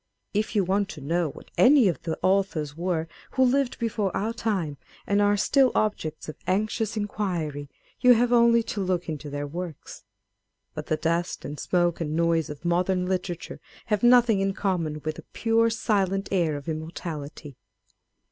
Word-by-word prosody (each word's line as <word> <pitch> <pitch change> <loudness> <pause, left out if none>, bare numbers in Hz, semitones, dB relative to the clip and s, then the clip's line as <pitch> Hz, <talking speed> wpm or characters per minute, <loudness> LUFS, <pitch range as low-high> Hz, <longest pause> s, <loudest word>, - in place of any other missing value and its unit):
If 215 +2 -1
you 205 - +4
want 195 +2 0
to 185 - -8
know 165 +3 0
what - - -13
any 260 -3 +7
of 175 - -1
the 165 -2 -3
authors 185 -6 +1
were 170 -1 -1 0.3
who 260 - +3
lived 260 0 +1
before 215 -3 -1
our 220 +3 -1
time, 195 -10 -2 0.3
and 205 0 +2
are 205 0 +3
still 265 +5 +3
objects 160 -8 -1
of 155 - -7
anxious 215 +3 0
inquiry, 170 -9 -3 0.3
you 250 0 +7
have 240 +1 +2
only 235 -1 +5
to 210 - -4
look 185 -2 -1
into 150 -2 -5
their 145 0 -4
works. 165 +1 -7 0.7
But 155 -1 -6
the 155 - 0
dust 170 +3 -1
and 145 +1 -6
smoke 175 -2 +1
and 155 -1 -2
noise 165 -1 +1
of 150 +3 -9
modern 180 +1 +1
literature 180 -2 -3 0.3
have 205 - +1
nothing 240 -3 +5
in 195 0 0
common 165 -6 -1
with 155 0 -2
the - - -10
pure, 230 0 +2
silent 195 -3 0
air 170 -6 +1
of 145 - -10
immortality. 155 -3 -6
185 Hz, 170 wpm, -26 LUFS, 160-215 Hz, 0.7 s, any